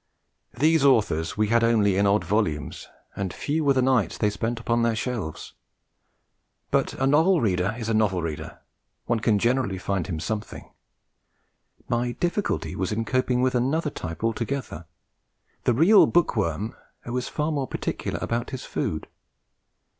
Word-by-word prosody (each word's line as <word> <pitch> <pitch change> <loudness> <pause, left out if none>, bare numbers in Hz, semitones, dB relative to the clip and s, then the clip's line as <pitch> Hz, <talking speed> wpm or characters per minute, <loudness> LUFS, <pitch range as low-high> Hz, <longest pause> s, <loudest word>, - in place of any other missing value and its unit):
These 155 +3 +3
authors 105 - +2
we 105 0 +1
had 115 +1 +3
only 110 -4 +3
in 100 +1 +3
odd 100 +2 +3
volumes, 95 -8 -1 0.3
and 95 -2 -3
few 155 - -2
were 140 -1 +4
the 130 -1 +2
nights 125 -5 +2
they 105 -1 +1
spent 115 +3 -3
upon 115 0 0
their 115 -1 +2
shelves. 110 -9 -4 1.2
But - - +1
a 135 - 0
novel 160 +6 +4
reader 100 -2 0
is 115 -3 -5
a 115 - 0
novel 100 -5 +1
reader, 80 -3 -6 0.4
one 120 - 0
can 110 -1 +2
generally 120 -3 +1
find 95 -1 -2
him 80 -4 -3
something; 110 +5 -5 1.2
my 120 0 0
difficulty 175 - -2
was 95 +1 -2
in 115 +1 -1
coping 130 0 +1
with 130 -1 +2
another 140 +5 0
type 80 -3 -7
altogether 115 - -3 0.8
the 125 - +4
real 180 - +6
bookworm 110 - 0 0.3
who 120 - -6
is 125 -1 -2
far 150 +1 -1
more 140 -3 -1
particular - - -3
about 120 +1 -2
his 130 -2 -6
food. 80 - -3
115 Hz, 155 wpm, -25 LUFS, 100-130 Hz, 1.2 s, real